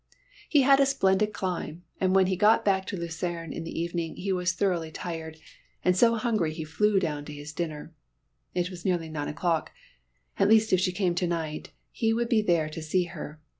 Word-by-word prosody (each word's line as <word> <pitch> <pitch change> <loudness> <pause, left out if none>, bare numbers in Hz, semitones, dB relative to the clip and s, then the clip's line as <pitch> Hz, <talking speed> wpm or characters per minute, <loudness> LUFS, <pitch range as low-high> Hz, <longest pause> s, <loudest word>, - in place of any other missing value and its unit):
He 290 -4 +5
had 275 +1 +6
a 275 - +5
splendid 210 -5 +2
climb, 180 -4 -4 0.2
and 185 0 +2
when 190 -1 +6
he 185 0 0
got 210 +4 +4
back 190 -2 +2
to 195 - -4
Lucerne 170 -1 -4
in 165 - -5
the 165 - -5
evening 170 -1 -3
he 195 +1 -2
was 180 0 +1
thoroughly 175 -3 0
tired, 160 -1 -6 0.5
and 180 - +4
so 230 +4 +5
hungry 215 -9 0
he 160 - -4
flew 200 +6 +2
down 150 -5 -2
to 150 - -8
his 145 0 -8
dinner. 160 -1 -5 0.6
It 180 +1 0
was 175 -2 -9
nearly 175 -4 0
nine 150 -2 -4
o'clock; 165 +1 -1 0.7
at 195 - +4
least 220 -1 +5
if 185 - +5
she 185 0 +1
came 180 -1 0
to 175 +1 0
night 160 -3 -3 0.2
he 225 -2 +1
would 235 0 -1
be 225 -4 +4
there 170 -6 +2
to 155 +1 -7
see 170 +4 +1
her. 150 +1 -8
180 Hz, 205 wpm, -27 LUFS, 160-200 Hz, 0.7 s, had